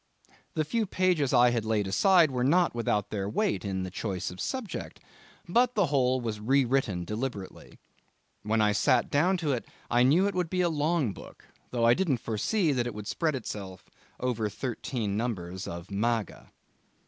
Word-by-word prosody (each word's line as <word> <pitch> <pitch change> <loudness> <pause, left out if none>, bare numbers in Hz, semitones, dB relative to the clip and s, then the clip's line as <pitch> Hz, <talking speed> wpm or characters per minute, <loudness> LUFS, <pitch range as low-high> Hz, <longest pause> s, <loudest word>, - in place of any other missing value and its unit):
The 155 - 0
few 225 +5 -1
pages 180 -8 +1
I 125 -1 +5
had 115 -2 0
laid 110 -2 0
aside 170 - +4
were 125 -1 -1
not 170 +6 +3
without 105 -3 -1
their 100 -2 -2
weight 195 - 0
in 95 -2 -2
the 95 - -5
choice 95 -2 -3
of 90 - -8
subject. 260 -6 -5 0.5
But 245 +7 +2
the 205 -3 +3
whole 130 -1 +3
was 110 -3 -4
re 135 +5 +3
written 115 -9 0
deliberately. 105 -1 -6 0.6
When 110 +1 +1
I 105 -1 +4
sat 105 - +2
down 175 +7 +3
to 160 -4 -1
it 125 -3 -1 0.3
I 120 0 +4
knew 150 +10 +4
it 200 - 0
would 180 -2 -1
be 180 +1 0
a 175 - +2
long 150 - 0
book, - - -13 0.2
though 120 -2 0
I 120 - +7
didn't 170 -7 +1
foresee 150 - 0
that 125 -3 0
it 120 - -6
would 105 -1 -7
spread 155 +6 -1
itself 100 -6 -7 0.3
over 115 -4 -1
thirteen 115 -2 -3
numbers 95 -5 -3
of 85 +3 -7
Maga. 110 +2 -2
120 Hz, 185 wpm, -28 LUFS, 105-160 Hz, 0.6 s, I